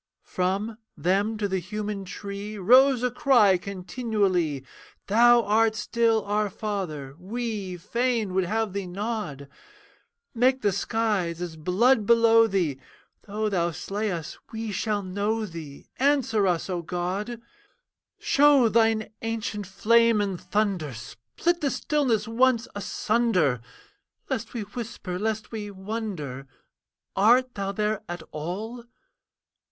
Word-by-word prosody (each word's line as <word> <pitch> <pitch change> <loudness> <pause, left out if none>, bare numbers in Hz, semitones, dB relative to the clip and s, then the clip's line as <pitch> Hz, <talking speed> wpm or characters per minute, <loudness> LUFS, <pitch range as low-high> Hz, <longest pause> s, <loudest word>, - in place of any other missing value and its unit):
From, 200 +5 -2 0.2
them 200 +5 +1
to 210 -1 -1
the 190 -1 -1
human 205 +2 -4
tree 200 +2 -6
Rose 250 +6 +5
a 250 - +1
cry 230 -8 +4
continually, 185 - -1 0.4
'Thou 235 +3 +5
art 220 +1 +3
still, 225 0 +1
our 210 0 0
Father, 180 -10 -4
we 205 -2 -4
Fain 230 +1 -1
would 190 -1 +2
have 220 +1 -1
thee 200 -2 -3
nod. 190 - -4 0.9
Make 255 +1 +2
the 205 - +3
skies 200 -4 -1
as 175 -2 -5
blood 205 +8 +2
below 230 -1 +6
thee, 175 -10 0 0.5
Though 215 +2 -1
thou 175 -4 +1
slay 205 +5 -3
us, 165 -4 -5
we 225 -1 -4
shall 205 +1 -1
know 205 +4 -1
thee. 160 -6 -9
Answer 260 -7 +2
us, 175 -2 0
O 180 -2 -2
God! 185 +7 -3 0.8
'Show 280 -4 +5
thine 225 -1 +2
ancient 225 -3 -3
flame 230 +3 +4
and 195 -4 -2
thunder, 190 - -1
Split 120 - -3
the 285 - +1
stillness 255 -9 0
once 235 +1 +2
asunder, 195 - +1 0.7
Lest - - -3
we 235 - -2
whisper, 205 -4 -6
lest 220 +1 -2
we 210 -2 -5
wonder 190 - -5 0.7
Art 245 +6 +4
thou 195 -1 -3
there 210 +1 -1
at 175 -2 -5
all?' 210 +10 -5
210 Hz, 125 wpm, -26 LUFS, 185-230 Hz, 0.9 s, below